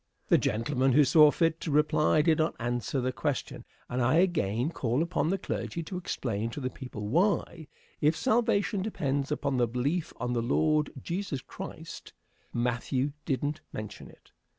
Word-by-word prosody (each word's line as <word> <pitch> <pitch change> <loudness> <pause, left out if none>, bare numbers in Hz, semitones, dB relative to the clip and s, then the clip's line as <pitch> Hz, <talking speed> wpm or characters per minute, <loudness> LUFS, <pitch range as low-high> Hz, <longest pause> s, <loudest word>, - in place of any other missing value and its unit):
The - - +6
gentlemen 130 +3 +1
who 150 - +6
saw 150 +2 +7
fit 165 +2 +1
to - - -3
reply 150 +1 +3
did 160 -1 +3
not 155 +1 +1
answer 120 +2 -1
the 130 0 0
question, 140 +1 -3 0.2
and 125 +1 -2
I 130 +5 +3
again 150 - +2
call 125 0 0
upon 170 -2 0
the 195 - +1
clergy 170 -2 -4
to 180 - -7
explain 115 - -2
to 115 - -6
the 130 -2 -3
people 110 -6 -7
why, 170 - +1 0.3
if 150 +2 +3
salvation 220 -5 +1
depends 140 -8 -1
upon 140 -3 0
belief 125 +8 0
on 125 +1 -1
the 120 - +1
Lord 150 +5 +2
Jesus 170 -4 -3
Christ, - - -9 0.4
Matthew 125 +3 -1
didn't 145 +3 -1
mention 105 -2 -7
it. - - -20
145 Hz, 160 wpm, -29 LUFS, 125-165 Hz, 0.4 s, saw